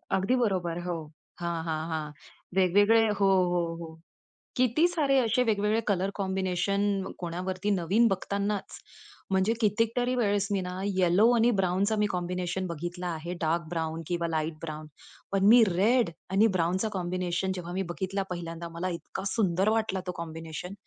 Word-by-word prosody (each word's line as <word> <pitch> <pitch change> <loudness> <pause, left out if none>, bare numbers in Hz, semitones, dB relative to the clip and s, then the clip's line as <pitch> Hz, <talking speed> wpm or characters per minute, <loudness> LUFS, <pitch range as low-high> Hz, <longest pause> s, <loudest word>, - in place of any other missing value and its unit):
अगदी 195 +7 +1
बरोबर 185 -8 0
हो. 175 -1 -2 0.4
हां, 170 -1 -2
हां, 155 -1 -1
हां 155 -2 -3 0.4
वेगवेगळे 205 +4 +4
हो 195 - +4 0.2
,हो, 175 -1 +2 0.2
हो. 165 - -6 0.7
किती 255 +7 +3
सारे 295 -6 +1
असे 245 +1 +2
वेगवेगळे 215 -1 +1
कलर 195 -1 +1
कॉम्बिनेशन 190 0 -1 0.4
कोणावरती 185 +3 -3
नवीन 195 +6 +3
बघतानाच, 200 +1 -2 0.5
म्हणजे 190 +3 +2
कितीतरी 230 +4 +1
वेळेस 205 -4 +1
मी 195 -2 +1
ना 180 0 -5 0.2
येलो 185 +5 +4
आणि 235 +1 +4
ब्राउनचा 195 +4 +1
कॉम्बिनेशन - - -2
मी 210 - +3
कॉम्बिनेशन 180 +1 -2
बघितला 175 +2 -5
आहे, 170 +1 -4
डार्क 165 +1 +1
ब्राउन 160 -1 -3
किंवा 170 -1 -1
लाईट 160 0 -1
ब्राउन. 155 -1 -6 0.4
पण 195 0 +2
मी 240 -1 +8
रेड 205 +5 +3 0.2
आणि 200 +4 +4
ब्राउनचा 180 +6 0
कॉम्बिनेशन 180 +1 -1
जेव्हा 175 -1 -6
मी 190 - -1
बघितला 195 +1 -2
पहिल्यांदा 170 -1 -5
मला 180 +2 -2
इतका - - -7
सुंदर 195 -1 +2
वाटला 215 -4 -1
तो - - 0
कॉम्बिनेशन. 165 +2 -7
185 Hz, 150 wpm, -28 LUFS, 170-205 Hz, 0.7 s, मी